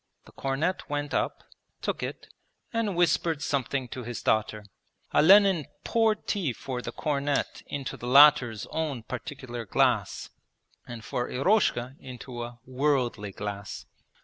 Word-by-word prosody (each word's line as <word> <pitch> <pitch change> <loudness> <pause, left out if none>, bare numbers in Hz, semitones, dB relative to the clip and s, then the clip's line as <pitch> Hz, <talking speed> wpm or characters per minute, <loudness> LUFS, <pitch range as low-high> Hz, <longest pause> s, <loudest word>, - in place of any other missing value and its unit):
The - - -16
cornet 140 +7 -2
went 145 0 -2
up, - - -1 0.4
took - - -2
it, - - -5 0.5
and 225 -4 0
whispered 165 -2 +2
something 135 -2 -1
to 130 - -6
his 120 -1 -6
daughter. 110 -1 0 0.5
Olenin 190 -2 +6 0.2
poured 225 -2 +1
tea 180 - -1
for 125 +2 -5
the - - -5
cornet 145 -1 -1
into 140 -2 -5
the 120 - -7
latter's 135 -5 +6
own 150 -7 -2
'particular' 125 -1 -6
glass, - - +1 0.6
and 120 -2 -8
for 120 0 -2
Eroshka 135 - +1
into 125 -1 -8
a 120 0 -7
'worldly' 125 -6 0
glass. 100 0 -6
135 Hz, 130 wpm, -27 LUFS, 120-155 Hz, 0.6 s, Olenin